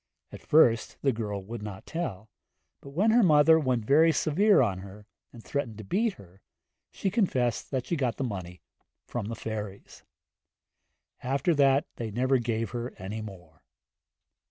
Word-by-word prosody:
At - - -10
first 120 -7 +3
the 135 - +3
girl 105 -4 -4
would 115 +3 -7
not 105 -2 -8
tell, 110 - -5 0.5
but 140 - -12
when 195 +10 +2
her 240 +2 +5
mother 160 -3 +6
'went 125 -6 0
very 160 +6 +5
severe 195 +7 +3
on 100 -7 +1
her,' 100 +2 -11 0.3
and 115 -2 -13
threatened 135 -7 -3
to 110 - -8
beat 210 - 0
her, 95 - -17 0.5
she 195 - -3
confessed 130 - 0
she 170 - -1
got 130 -6 -1
the - - -2
money 90 -7 -6 0.4
from 120 -4 -4
the 115 - -4
fairies. 105 -3 -7 1.2
After 140 +6 0
that 140 +1 +3
they 115 -2 -4
never 130 +4 +1
gave 115 -1 -2
her 120 0 -5
any 105 +4 -6
more. 90 -7 -11
120 Hz, 155 wpm, -28 LUFS, 105-145 Hz, 1.2 s, mother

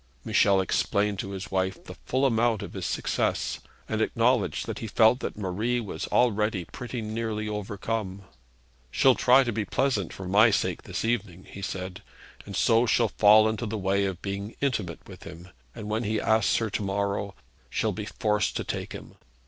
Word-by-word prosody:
Michel 100 -2 +4
explained 100 +1 0
to 100 - -4
his 100 +3 -6
wife 95 0 -1
the - - -9
full 130 +2 +1
amount 115 -3 +2
of - - -8
his 95 -3 -4
success, - - -1 0.3
and - - -1
acknowledged - - +1
that - - -5
he 115 - -5
felt 110 +3 +4
that - - -5
Marie 105 +5 -1
was 110 -4 -5
already 105 -5 +1
pretty 125 +2 -6
nearly 110 0 -3
overcome. 105 -1 -4 0.7
'She'll 130 - +4
try 130 +2 +5
to 120 - -2
be 110 -1 -1
pleasant 105 -6 0
for 95 - -7
my 105 +5 +6
sake 105 - 0
this - - -4
evening,' 100 -6 -2
he 100 - -10
said, 95 0 -5 0.5
'and 100 - -6
so 115 +4 +3
she'll 115 +1 +3
fall 105 +2 +6
into 110 +1 -2
the 110 +1 -3
way 100 0 +1
of 95 -3 -4
being 100 +2 -4
intimate 105 - -2
with - - -12
him; 85 +3 -11 0.3
and 110 -3 -7
when 110 +2 -1
he 110 0 0
asks 110 0 +2
her 110 -2 -1
to - - -2
morrow 100 0 -2 0.3
she'll - - 0
be - - -5
forced 105 -2 0
to - - -2
take - - -5
him.' - - -10
105 Hz, 185 wpm, -27 LUFS, 100-115 Hz, 0.7 s, my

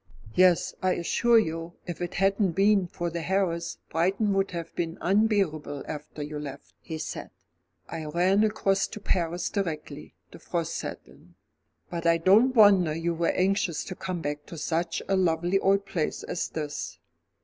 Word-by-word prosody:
"Yes, 180 -2 +4
I 185 0 +2
assure 235 +7 +3
you, 165 -4 -1
if 175 -1 -6
it 175 - -4
hadn't 195 -1 +2
been 195 0 +3
for 175 0 -4
the 170 0 -3
harriers, 175 -2 -1
Brighton 195 +5 +1
would 195 0 +1
have 170 -2 -6
been 165 -1 -2
unbearable 190 -8 +1
after 150 0 -6
you 150 0 -5
left," 140 -2 -8
he 160 - -6
said. - - -5 0.6
"I 160 -2 -5
ran 180 +6 +2
across 195 -2 +1
to - - -8
Paris 175 -3 -1
directly 155 -6 -4 0.2
the - - -12
frost 170 -2 -3
set - - -5
in. - - -20 0.6
But 170 -1 -2
I 165 0 +5
don't 210 +10 +5
wonder 195 -8 +6
you 170 +1 -1
were 170 0 0
anxious 185 -3 +1
to 185 - -7
come 185 -2 -4
back 145 0 -4
to 170 - -8
such 165 +2 -1
a 195 - +2
lovely 175 +1 +2
old 195 +1 +2
place 175 -5 -2
as - - -3
this." 150 -2 -5
175 Hz, 170 wpm, -27 LUFS, 165-195 Hz, 0.6 s, wonder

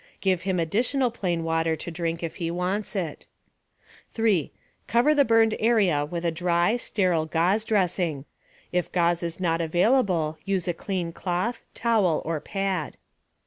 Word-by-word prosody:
Give 185 -3 +1
him 185 -1 -1
additional 240 - +1
plain 175 -7 -2
water 165 0 +1
to 165 +2 -6
drink 165 0 -3
if 165 - -4
he 170 -3 -2
wants 185 +5 -2
it. 170 -6 -4 0.9
3. 215 - +1 0.4
Cover 240 +7 +4
the 290 -1 +5
burned 225 -2 +4
area 200 -10 +3
with 170 +3 -5
a 170 - +2
dry, 175 +4 +1
sterile 180 -9 0
gauze 175 +7 +1
dressing. 180 -9 0 0.5
If 180 -1 -1
gauze 175 -1 +2
is 170 0 -4
not 170 -2 0
available, 175 -2 +1
use 195 -3 -1
a 175 - +1
clean 175 -1 -3
cloth, 185 +8 -2
towel 215 -9 +2
or 160 -1 -1
pad. 195 -3 -3
180 Hz, 150 wpm, -25 LUFS, 165-205 Hz, 0.9 s, the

